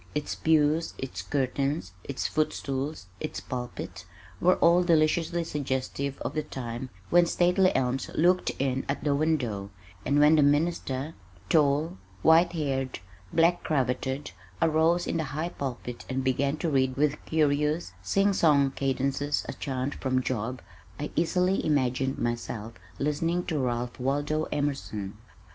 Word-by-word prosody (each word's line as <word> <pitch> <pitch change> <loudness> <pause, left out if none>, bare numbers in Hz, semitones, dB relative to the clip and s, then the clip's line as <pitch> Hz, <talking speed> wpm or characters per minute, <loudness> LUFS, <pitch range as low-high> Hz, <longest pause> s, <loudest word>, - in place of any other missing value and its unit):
Its 150 - -2
pews, 160 +1 +2
its 135 - -5
curtains, 140 - -1
its 140 - -4
footstools, 140 -4 -2
its 100 - -4
pulpit, 125 +5 -6 0.4
were 180 +1 +4
all 170 +1 +5
deliciously 165 0 +2
suggestive 140 -2 -3
of - - -3
the 155 - 0
time 125 -3 -6 0.2
when 175 0 +6
stately 180 +2 +3
elms 130 +1 0
looked 180 +3 +3
in 135 -1 0
at 140 - -2
the 145 - +2
window, 130 -10 0 0.3
and 145 +1 +2
when 150 +2 +6
the - - +5
minister, 145 -1 +1 0.4
tall, 150 - +2 0.2
white 165 +2 +5
haired, 135 -5 -2 0.3
black 170 +2 +3
cravatted 130 -2 -1 0.3
arose 165 +2 +3
in - - -1
the 160 - 0
high 165 +3 -1
pulpit 125 -6 -5
and 130 0 -1
began 140 +3 +1
to 170 - -2
read 130 -1 +1
with 150 +1 +1
curious, 150 +1 +1
sing 200 0 +2
song 145 -6 +4
cadences 140 +2 -1
a - - -4
chant 130 0 -3
from 130 -1 0
Job 125 +1 -3 0.4
I 150 - -4
easily 180 +3 +2
imagined 130 -2 +1
myself 115 -1 -3 0.2
listening 165 +5 0
to 160 -4 -1
Ralph 120 -1 -2
Waldo 145 +4 0
Emerson. 135 -9 -2
145 Hz, 140 wpm, -28 LUFS, 130-160 Hz, 0.4 s, when